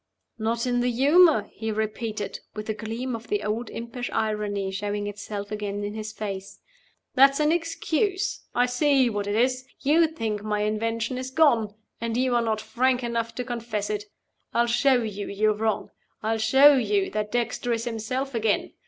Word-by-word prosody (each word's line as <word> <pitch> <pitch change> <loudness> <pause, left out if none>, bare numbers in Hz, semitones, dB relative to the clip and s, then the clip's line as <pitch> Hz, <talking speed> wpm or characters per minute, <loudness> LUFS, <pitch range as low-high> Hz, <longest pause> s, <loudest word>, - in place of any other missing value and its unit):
"Not 230 +2 0
in 245 -1 +1
the 245 +1 +2
humor?" 280 - +5
he 220 0 -3
repeated, 215 -1 -3 0.2
with 215 0 -5
a - - +1
gleam 230 +3 -4
of 230 +1 -9
the 415 0 -1
old 220 +2 -2
impish 235 +1 -5
irony 205 -3 -1
showing 205 +1 -3
itself 205 0 -6
again 205 -1 -3
in 205 0 -3
his 215 0 -5
face. 195 -3 -6 0.6
"That's 275 +2 +6
an 300 0 +3
excuse. 345 +4 -1
I 245 - +4
see 260 0 +3
what 205 -1 -2
it 205 - 0
is! 255 +2 +2 0.2
You 320 +4 +4
think 225 -10 -3
my 210 0 -1
invention 225 +3 -1
is 255 0 -4
gone 240 -8 +3 0.2
and 230 0 -2
you 255 0 +2
are 240 - +3
not 220 -2 -1
frank 255 +2 +1
enough 230 -1 -2
to 250 - -2
confess 230 -4 -3
it. 210 0 -3 0.5
I'll 235 - +4
show 245 +1 +3
you 205 -2 -4
you're 215 +2 +2
wrong. 220 0 -1 0.3
I'll 225 +1 0
show 270 +6 +7
you 205 -6 +1
that 210 0 -2
Dexter 245 0 -1
is 230 -1 -1
himself 250 +4 -3
again. 220 -2 0
230 Hz, 180 wpm, -25 LUFS, 210-255 Hz, 0.6 s, show